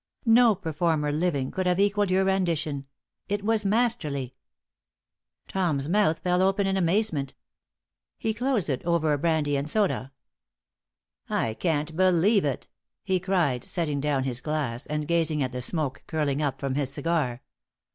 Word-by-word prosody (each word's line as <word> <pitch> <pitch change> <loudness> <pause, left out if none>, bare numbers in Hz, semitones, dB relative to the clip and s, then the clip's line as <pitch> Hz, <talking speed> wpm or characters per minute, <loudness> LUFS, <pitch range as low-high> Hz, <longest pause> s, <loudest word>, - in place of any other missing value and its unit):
No 230 -1 +6
performer 160 -4 0
living 150 -4 -1
could 185 -1 -2
have 180 +1 +2
equaled 205 0 +2
your 190 +1 +2
rendition. 165 -7 -1 0.4
It 205 0 -1
was 220 0 +1
masterly." 195 - 0 1.1
Tom's 155 -8 -1
mouth 185 -2 +2
fell 180 0 +1
open 195 +1 +2
in 195 0 +1
amazement. 170 -6 0 0.8
He 220 - -1
closed 245 -4 0
it 135 -4 -2
over 165 -3 +1
a 145 - -1
brandy 155 -2 +1
and 140 +2 -3
soda. 150 - 0 1.2
"I 110 - 0
can't 155 +2 -1
believe 185 +2 +3
it," 140 -3 -2 0.4
he 190 -1 +1
cried, 175 -10 0
setting 155 -6 -2
down 145 -2 0
his 130 -2 -3
glass 140 -5 -3
and 150 0 -3
gazing 160 -3 +1
at 130 - -2
the 125 0 -4
smoke 140 0 -2
curling 150 -3 -1
up 145 -3 -1
from 135 -1 -2
his 135 -1 -1
cigar. 145 -6 -1
160 Hz, 150 wpm, -26 LUFS, 145-190 Hz, 1.2 s, No